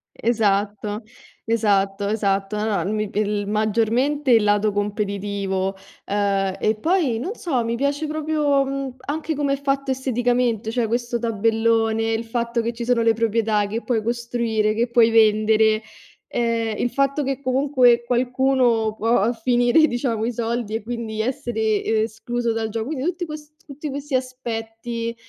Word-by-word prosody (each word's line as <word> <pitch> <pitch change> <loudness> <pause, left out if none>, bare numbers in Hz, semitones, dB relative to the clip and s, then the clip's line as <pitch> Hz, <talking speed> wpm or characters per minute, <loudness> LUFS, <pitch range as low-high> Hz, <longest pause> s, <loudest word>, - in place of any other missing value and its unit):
Esatto, 210 -1 0 0.4
esatto, 200 -3 +1
esatto. 200 -1 0
No 215 -1 0
mi 215 -1 -1
il 205 -1 -1
maggiormente 230 +7 +1
il 225 -2 +6
lato 205 0 +2
competitivo, 200 -2 -2 0.3
ehm, 195 -1 0
e 215 - +1
poi, 305 - +1
non 360 - -3
so, 260 -9 -1
mi 230 +1 -1
piace 285 +3 -1
proprio, 300 -2 +1
mhmm, 270 -1 -4
anche 310 +1 -2
come 280 -1 0
è 275 - -3
fatto 275 -1 0
esteticamente. 245 -3 0
Cioè, 230 -1 0
questo 240 +1 -1
tabellone, 225 0 +1
il 225 +1 -1
fatto 235 0 -1
che 235 +1 -2
ci 235 +1 -5
sono 240 -1 +2
le 225 0 +4
proprietà, 220 -2 +1
che 225 +3 -4
puoi 230 -4 0
costruire, 235 -2 0
che 235 +2 0
puoi 235 -2 +5
vendere, 220 0 +4 0.5
ehm, 230 -2 -1
il 245 - 0
fatto 275 +1 +1
che 270 0 -2
comunque 255 -3 +3
qualcuno 245 -2 +1
può 225 0 +2
finire, 245 +6 +3
diciamo, 240 -3 -1
i 240 - -2
soldi 230 -1 -2
e 220 - -3
quindi 225 -2 -4
essere 220 -3 -1 0.2
escluso 230 +2 -2
dal 225 0 -1
gioco. 220 +2 -4
Quindi 290 -2 -3
tutti 355 0 -2
quest 305 -1 -9
tutti 295 +1 -7
questi 280 0 -4
aspetti, 230 -2 -4
230 Hz, 150 wpm, -22 LUFS, 215-255 Hz, 0.5 s, il